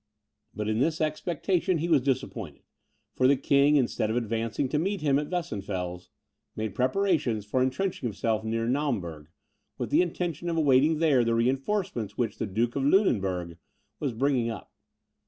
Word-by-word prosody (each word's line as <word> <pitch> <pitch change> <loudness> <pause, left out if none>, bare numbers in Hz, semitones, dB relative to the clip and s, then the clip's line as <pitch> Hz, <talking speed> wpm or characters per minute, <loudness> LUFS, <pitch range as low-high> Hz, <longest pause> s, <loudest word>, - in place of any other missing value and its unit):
But 105 -1 -3
in 110 +1 0
this 160 +4 +1
expectation 170 +3 0
he 165 +2 -2
was 155 -6 +4
disappointed; 135 -1 -3 0.5
for 130 - +3
the 140 - +5
king, 140 +2 +4
instead 120 -5 +1
of 110 - -1
advancing 115 +3 -1
to 150 - 0
meet 195 +2 -1
him 140 -2 +3
at 150 - -4
Weissenfels, 95 - -4 0.5
made 110 -2 -3
preparations 130 - +1
for 125 +5 0
entrenching 130 +3 -1
himself 110 +1 -1
near 115 +1 -1
Naumburg, 100 - -2 0.5
with - - -4
the - - +5
intention 175 -1 -2
of 165 - -1
awaiting 150 +1 +4
there 150 -6 +3
the 115 0 +1
reinforcements 130 - -1
which 120 -2 -2
the - - -1
Duke 115 +5 -1
of 140 - 0
Lunenburg 95 - +1 0.4
was 140 -3 -1
bringing 125 -1 +1
up. 110 -4 -7
130 Hz, 160 wpm, -27 LUFS, 110-155 Hz, 0.5 s, the